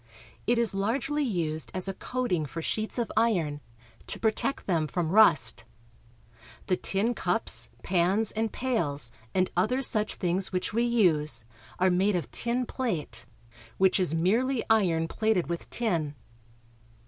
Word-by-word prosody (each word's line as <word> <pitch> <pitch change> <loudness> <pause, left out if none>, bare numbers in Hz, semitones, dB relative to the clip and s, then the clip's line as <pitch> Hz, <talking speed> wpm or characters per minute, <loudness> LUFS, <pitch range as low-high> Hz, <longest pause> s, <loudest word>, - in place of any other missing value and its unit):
It 240 - +3
is 235 -3 +2
largely 245 +9 -1
used 165 - -2
as 185 0 0
a 195 - -2
coating 190 -8 -2
for 165 - -6
sheets 215 +7 -3
of 235 -2 -1
iron, 175 -10 +1 0.5
to - - -2
protect 225 +5 0
them 165 -5 +1
from 165 0 -2
rust. 155 - +5 1.0
The 185 - +1
tin 200 +6 0
cups, - - +1
pans, 190 +4 +1
and 220 0 -2
pails, 150 - -1 0.2
and 185 -1 +2
other 250 +9 +1
such 215 -4 +2
things 185 +1 -1
which 185 +2 -2
we 235 +2 +2
use 170 - +2 0.3
are 185 0 +3
made 190 +3 +2
of 175 - -3
tin 245 +2 -1
plate, 170 - -4 0.5
which 190 +1 +3
is 175 -4 +1
merely 230 +9 +1
iron 170 -7 +3
plated 215 -2 0
with 170 0 -5
tin. 165 -11 -1
190 Hz, 145 wpm, -28 LUFS, 165-230 Hz, 1.0 s, rust